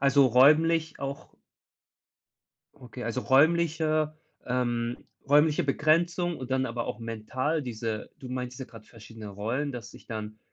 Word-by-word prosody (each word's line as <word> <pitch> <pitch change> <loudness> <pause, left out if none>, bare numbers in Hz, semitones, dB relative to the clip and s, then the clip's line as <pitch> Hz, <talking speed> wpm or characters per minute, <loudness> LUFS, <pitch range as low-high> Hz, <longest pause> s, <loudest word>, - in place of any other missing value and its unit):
also, 140 0 +5
räumlich 155 +6 +4
auch 140 0 -5 1.4
Okay, 125 0 -9
also, 115 +2 -2
räumliche 155 +1 +3 0.3
ähm, 120 -1 -1 0.3
räumliche 150 +2 +4
Begrenzung 170 +4 +1
und 130 0 -7
dann 130 0 +1
aber 120 0 -3
auch - - -4
mental 130 +7 -2
diese 115 -3 -4
du 130 - -9
meinst 125 0 -5
jetzt 130 - -8
gerade 115 -2 -13
verschiedenen 110 -1 -11
Rollen, 115 +9 -2
dass 120 -1 -8
ich - - -15
dann, 110 -1 -6
130 Hz, 135 wpm, -28 LUFS, 115-155 Hz, 1.4 s, also